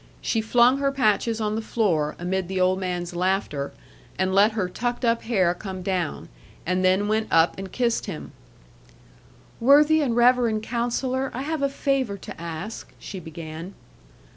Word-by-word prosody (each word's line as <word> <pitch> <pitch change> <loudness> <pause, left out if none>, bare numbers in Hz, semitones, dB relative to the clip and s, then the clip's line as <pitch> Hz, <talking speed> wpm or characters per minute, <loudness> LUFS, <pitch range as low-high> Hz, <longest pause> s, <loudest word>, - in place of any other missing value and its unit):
She 225 - 0
flung 240 +4 +4
her 275 0 +1
patches 225 -3 +1
on 210 -1 -1
the 220 - -1
floor, 175 -10 0
amid 180 +1 -2
the 190 0 -2
old 185 +1 +2
man's 180 -1 -3
laughter, 180 -6 -1 0.5
and 190 0 0
let 205 +3 +5
her 210 -4 -1
tucked 240 +6 -3
up 230 0 +2
hair 190 -7 +2
come 185 0 -7
down; 180 -4 -2 0.4
and 185 +1 0
then 190 +2 +3
went 215 +1 0
up 165 +1 +4
and 195 -1 -7
kissed 235 -3 0
him. 180 -6 -6 1.3
'Worthy 295 +5 +5
and 250 -6 0
reverend 240 -3 +3
Counsellor, 250 +3 -1
I 260 - -3
have 315 0 -2
a 280 - +2
favour 270 -7 -1
to 185 - -10
ask,' 170 +6 -6
she 190 - -8
began. 160 +2 -8
210 Hz, 165 wpm, -24 LUFS, 185-240 Hz, 1.3 s, let